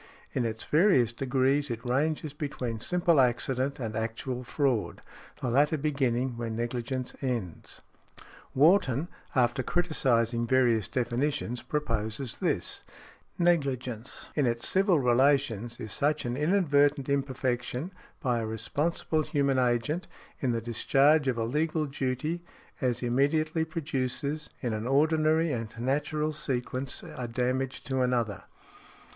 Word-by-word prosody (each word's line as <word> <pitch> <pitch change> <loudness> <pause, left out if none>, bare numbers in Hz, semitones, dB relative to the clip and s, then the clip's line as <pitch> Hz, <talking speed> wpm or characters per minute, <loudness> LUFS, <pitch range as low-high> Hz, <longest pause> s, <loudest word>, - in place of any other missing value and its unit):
In 125 - 0
its 110 0 -3
various 150 - +4
degrees 135 +3 +1
it 120 +1 -5
ranges 145 +4 0
between 130 -6 -4
simple 175 +3 +2
accident 130 +2 0
and 110 -3 -4
actual 115 +3 -3
fraud, 130 -4 0 0.4
the 125 - -1
latter 145 +5 +3
beginning 130 -4 0
where 115 -1 -3
negligence 120 +3 -3
ends. 120 - -4 0.7
Wharton, 150 0 +4 0.3
after 125 0 +2
criticising 120 -8 +1
various 120 -5 +3
definitions, 125 0 -1
proposes 115 -4 -2
this, - - -1 0.6
"Negligence, 135 -8 0
in 145 -4 +2
its 115 0 0
civil 190 -4 +3
relations, 125 -3 +2
is 110 -4 -6
such 150 +4 0
an 120 0 -1
inadvertent 145 -3 +2
imperfection, 130 +1 -1 0.3
by 125 -3 +1
a 110 - -2
responsible 150 +8 -1
human 140 -3 +1
agent, 125 +8 0 0.3
in 130 - 0
the 115 -1 0
discharge 135 +6 +3
of 125 -3 +1
a 115 - 0
legal 155 +5 0
duty, 140 +4 -2 0.4
as 125 -2 0
immediately 155 +6 +1
produces, 150 -2 -2
in 120 -4 -1
an 110 +2 -3
ordinary 155 +3 +3
and 115 -2 -4
natural 150 +4 0
sequence, 130 -2 -3
a 125 - -6
damage 125 +2 -1
to 130 -1 -1
another". 120 -5 0
130 Hz, 125 wpm, -29 LUFS, 120-150 Hz, 0.7 s, various